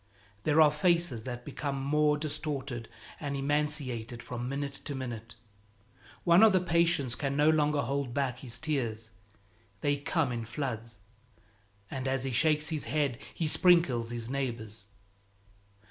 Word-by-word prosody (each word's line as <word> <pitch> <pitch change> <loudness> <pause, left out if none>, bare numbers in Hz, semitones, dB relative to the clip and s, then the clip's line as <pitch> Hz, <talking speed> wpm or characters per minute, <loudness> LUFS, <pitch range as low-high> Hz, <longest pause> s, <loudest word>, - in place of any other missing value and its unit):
There 155 0 +3
are 150 -1 +7
faces 160 -6 +1
that 125 -1 -6
become 140 -2 -3
more 150 +2 +2
distorted 140 -5 -4 0.3
and 140 -2 -3
emaciated 135 -5 -1
from 120 0 -5
minute 140 0 -4
to 145 - -3
minute. 115 -4 -6 0.9
One 170 +1 +6
of 220 -2 +7
the 185 - +5
patients 170 -7 +2
can 140 +2 -2
no 150 +2 +5
longer 150 -2 +2
hold 140 0 -2
back 130 -1 -1
his 125 -3 -2
tears; 115 -8 -2 0.7
they 145 0 +1
come 145 -1 0
in 115 -1 -3
floods, 115 -3 -4 0.9
and 135 0 -3
as 130 -1 0
he 135 - -2
shakes 155 +3 +3
his 155 -3 -2
head 135 -1 0
he 165 - -3
sprinkles 155 -8 +4
his 120 -1 -5
neighbors. 115 -6 -4
140 Hz, 145 wpm, -30 LUFS, 120-150 Hz, 0.9 s, are